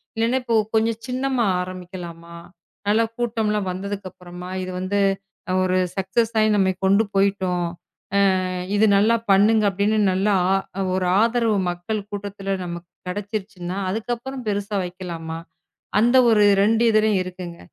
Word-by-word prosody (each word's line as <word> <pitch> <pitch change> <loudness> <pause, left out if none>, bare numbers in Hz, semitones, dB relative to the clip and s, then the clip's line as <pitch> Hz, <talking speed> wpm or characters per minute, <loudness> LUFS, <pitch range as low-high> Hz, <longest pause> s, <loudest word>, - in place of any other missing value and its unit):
இல்லனா 230 +3 +1
இப்போ 230 -2 0 0.2
கொஞ்சம் 225 0 +1
சின்னமா 255 -1 0 0.2
ஆரம்பிக்கலாமா? 175 -2 -8 0.5
நல்ல 215 +2 +4 0.2
கூட்டம் 225 -3 -1
எல்லாம் 210 -3 -1
வந்ததுக்கு 195 +1 -5
அப்புறமா 180 0 -10
இது 185 - -5
வந்து 195 +2 -1 0.6
ஒரு 185 0 +1 0.2
சக்சஸ் 195 +4 0 0.3
நாம 190 -2 +3
கொண்டு 200 +3 +4
போயிட்டோம். 190 -3 +1 1.1
இது 210 +1 +4
நல்லா 220 +4 +4 0.2
பண்ணுங்க 215 +3 +5
அப்படின்னு 200 +3 +1
நல்லா 195 +3 +1 0.6
ஒரு 185 -1 0
ஆதரவு 230 -1 +2 0.2
மக்கள் 175 +5 -3
கூட்டத்துல 200 -1 -5
நமக்குக் 175 0 -7 0.2
கிடைச்சிடுச்சுன்னா 195 -2 -5
அதுக்கப்புறம் 240 +4 -4
பெருசா 205 0 -2
வைக்கலாமா? 170 -3 -6 0.6
அந்த 240 +4 +4
ஒரு 210 -2 +5 0.2
2 225 +2 +3
இதலயும் 215 -2 +3
இருக்குங்க. 180 -2 -8
200 Hz, 120 wpm, -22 LUFS, 185-220 Hz, 1.1 s, பண்ணுங்க